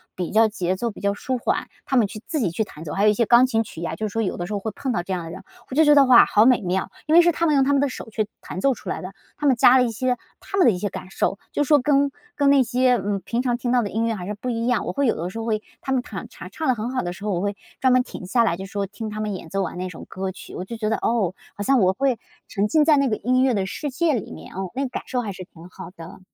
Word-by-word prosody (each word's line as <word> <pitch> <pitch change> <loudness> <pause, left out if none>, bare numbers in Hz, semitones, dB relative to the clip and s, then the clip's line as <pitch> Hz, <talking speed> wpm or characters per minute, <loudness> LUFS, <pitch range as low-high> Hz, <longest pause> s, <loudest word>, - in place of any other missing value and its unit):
比 180 -2 -3
较 225 +1 +5
节 185 -4 -2
奏 235 +5 -2
比 210 - -10
较 200 0 +1
舒 255 +5 -3
缓， 235 - -1 0.2
他 270 - -1
们 225 -4 +4
去 215 - -8
自 315 - -2
己 220 - +1
去 175 +7 -1
弹 160 -6 -11
奏， 155 - -6
还 195 - 0
有 210 - +6
一 - - +4
些 230 +1 +1
钢 240 +1 +7
琴 225 -3 +1
曲 170 -5 -9
啊， - - -3
就 215 - -3
是 - - -8
说 225 +2 -1
有 190 - -2
的 175 - -4
时 210 - -5
候 205 - -1
会 220 +2 -4
碰 265 - -3
到 175 -7 -1
这 190 - -4
样 180 -2 -3
的 165 - -7
人。 175 - -9 0.3
我 260 - -5
就 315 +2 +5
觉 295 - +7
得， 285 -1 +7
哇， 255 -2 +8
好 215 +3 +4
美 255 -3 +4
妙， 185 0 -1 0.2
因 310 - 0
为 340 - +9
是 345 0 +4
他 335 - -1
们 310 - +3
用 275 -2 +4
他 280 +2 +2
们 280 - +3
的 - - +2
手 245 - -8
去 215 -1 -2
弹 - - -7
奏 270 +7 +3
出 230 - -9
来 - - -3
的， 185 +1 -7 0.2
他 295 - -4
们 270 -3 +5
加 245 +2 +6
了 255 - +5
一 240 - -1
些 250 +3 -1 0.2
他 395 - -5
们 375 - +5
的 240 - +6
一 180 - -4
些 205 - -2
感 185 - -8
受， 195 - 0
就 290 - +1
说 290 +1 +4
跟 280 +1 +2 0.3
跟 285 -4 +3
那 280 -2 +5
些， 250 +1 +2
嗯， 200 -3 -2
平 240 +5 -2
常 245 -2 +1
听 240 0 -2
到 245 -1 +3
的 205 - -4
音 225 +2 0
乐 225 - 0
还 180 -3 -6
是 205 - -3
不 210 +5 -5
一 230 -1 -1
样， 245 -2 +1
我 - - -1
会 280 - +1
有 235 - +2
的 170 +3 -4
时 190 - -8
候 225 - -4
会 215 -2 0 0.2
他 265 - -4
们 260 -2 +2
唱 - - -7 0.3
唱 315 - -3
得 260 - +4
很 230 0 -4
好 260 - -1
的 175 0 -3
时 180 +3 -12
候， 210 - -1
我 175 - -1
会 205 +1 -1 0.2
专 260 -1 +4
门 255 - +5
停 220 - -8
下 235 +6 +2
来 170 -7 +1
就 190 - -6
说 200 +1 -3
听 210 +2 -6
他 215 0 -6
们 215 -1 -2
演 180 -3 -8
奏 195 +2 -1
完 180 - -4
那 185 +1 -3
种 170 - -10
歌 190 0 -4
曲， 190 - -11
我 - - -4
就 230 +4 -7
觉 215 -1 -1
得， 220 - +1
哦， 210 -7 0 0.2
好 205 - -4
像 270 +4 +3
我 185 -1 +4
会 265 +1 +1 0.3
沉 200 0 0
浸 300 +7 +3
在 310 -1 +6
那 275 0 +3
个 215 - +1
音 255 +3 +2
乐 260 -2 +3
的 195 -3 0
世 290 +10 -4
界 315 +3 +1
里 230 - -3
面， 80 +1 -10
嗯， 190 0 -4
那 270 - -1
个 270 - -2
感 - - -5
受 250 - -1
还 215 -4 -4
是 185 - -8
挺 170 -1 -14
好 - - -10
的。 165 +1 -11
225 Hz, 365 characters per minute, -23 LUFS, 195-255 Hz, 0.3 s, 为